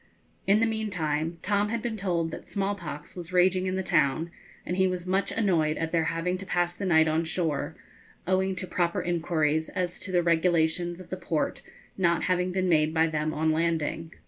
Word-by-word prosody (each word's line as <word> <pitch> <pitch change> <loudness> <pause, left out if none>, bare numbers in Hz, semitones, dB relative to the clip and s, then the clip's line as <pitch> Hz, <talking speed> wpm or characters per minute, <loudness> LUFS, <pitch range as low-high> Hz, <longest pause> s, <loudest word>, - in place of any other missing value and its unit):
In 200 +2 +5
the 225 - +4
meantime 170 -8 -1
Tom 205 +1 +1
had 230 0 -2
been 235 -2 -2
told 175 -5 -1
that - - -9
small 200 0 0
pox 150 -6 -8
was 175 -1 -7
raging 185 +1 +3
in 185 - -1
the 190 - -1
town, 160 -1 +1 0.3
and 180 - -2
he 190 0 +4
was 180 -1 -3
much 190 +1 0
annoyed 170 -8 +1
at 165 0 -2
their 165 -2 +2
having 165 +3 -1
to 195 - -7
pass 175 -1 +1
the 190 +2 -4
night 160 -2 +5
on 160 +1 +1
shore, 160 -2 -2 0.5
owing 190 +1 +1
to 185 - -3
proper 175 -1 0
inquiries 160 -2 0
as 180 -2 -3
to 190 - -7
the 175 -1 +3
regulations 170 +1 +1
of 185 - -12
the 185 - -2
port 165 -3 -2 0.4
not 170 -2 +2
having 180 0 +1
been 185 0 0
made 155 -2 +3
by 160 0 +4
them 155 -1 -1
on 155 +1 +1
landing. 165 0 -1
175 Hz, 200 wpm, -27 LUFS, 160-185 Hz, 0.5 s, In